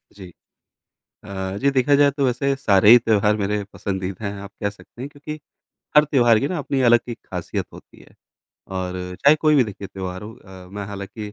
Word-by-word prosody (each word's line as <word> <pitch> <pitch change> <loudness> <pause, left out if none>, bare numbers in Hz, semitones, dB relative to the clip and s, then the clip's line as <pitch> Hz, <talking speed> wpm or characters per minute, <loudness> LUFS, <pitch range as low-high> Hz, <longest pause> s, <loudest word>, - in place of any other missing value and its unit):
जी। 95 -3 -11 0.9
अ, 95 -1 -5
जी 140 - +3
देखा 140 +2 +3
जाए 140 0 +4
तो 140 0 -1
वैसे 135 +2 0
सारे 100 -6 +4
ही 120 - +11
त्योहार 105 -3 +2
मेरे 105 0 -1
पसंदीदा 95 +1 -4
हैं 100 - -3
आप 100 0 -10
कह 100 - 0
सकते 105 +3 -15
हैं 135 - -5
क्योंकि, 150 +2 -8 0.6
हर 150 - +8
त्योहार 120 -6 +4
की 140 - -1
ना 180 - -3
अपनी 140 -2 -2
अलग 120 0 +6
एक 115 - -6
खासियत - - -4
होती - - -16
है। - - -19 0.6
और 90 0 -3 0.3
चाहे 145 +2 +7
कोई 155 -1 +4
भी 130 - +5
देखिए 100 -2 -8
त्योहार 95 0 -6
हो 110 - -8
अ, 95 -5 -14
मैं 100 +1 -6
हालाँकि 105 +1 -7
105 Hz, 200 wpm, -22 LUFS, 100-135 Hz, 0.9 s, ही